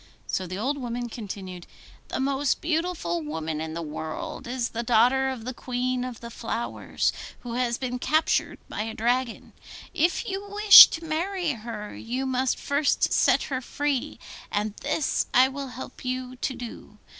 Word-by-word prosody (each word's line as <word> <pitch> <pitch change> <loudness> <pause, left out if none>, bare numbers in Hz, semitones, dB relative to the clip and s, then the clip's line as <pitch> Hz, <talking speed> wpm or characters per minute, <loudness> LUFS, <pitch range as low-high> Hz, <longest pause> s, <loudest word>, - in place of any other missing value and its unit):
So 185 - -2
the 185 +2 -5
old 275 +7 -1
woman 240 -1 -4
continued, 190 -5 -7 0.4
'The - - -3
most 270 +1 +1
beautiful 320 - -1
woman 155 0 -4
in 160 0 -5
the 170 - -3
whole 155 - -6
world 160 - -5
is 245 -1 -2
the 230 - -3
daughter 245 +3 +3
of 250 -4 -6
the 255 - -4
Queen 250 0 -2
of 250 -2 -6
the 235 0 -8
Flowers, 235 +1 -2 0.3
who 240 -2 -6
has 240 -1 0
been 250 -1 -3
captured 310 +5 +1
by - - -4
a 220 0 -4
dragon. 245 +1 -1 0.4
If 345 0 +1
you 400 +1 -4
wish 415 0 +11
to 325 0 -6
marry 345 +2 -1
her, 220 -3 -7
you 250 +3 -3
must 260 0 0
first 285 +1 +1
set - - +4
her 260 -2 -3
free, 285 +1 -2 0.3
and 210 0 -1
this 300 - 0
I 255 +2 +7
will 275 0 -5
help 250 0 -9
you 255 0 -3
to 260 +1 -2
do. 230 -3 -9
250 Hz, 170 wpm, -26 LUFS, 225-275 Hz, 0.4 s, wish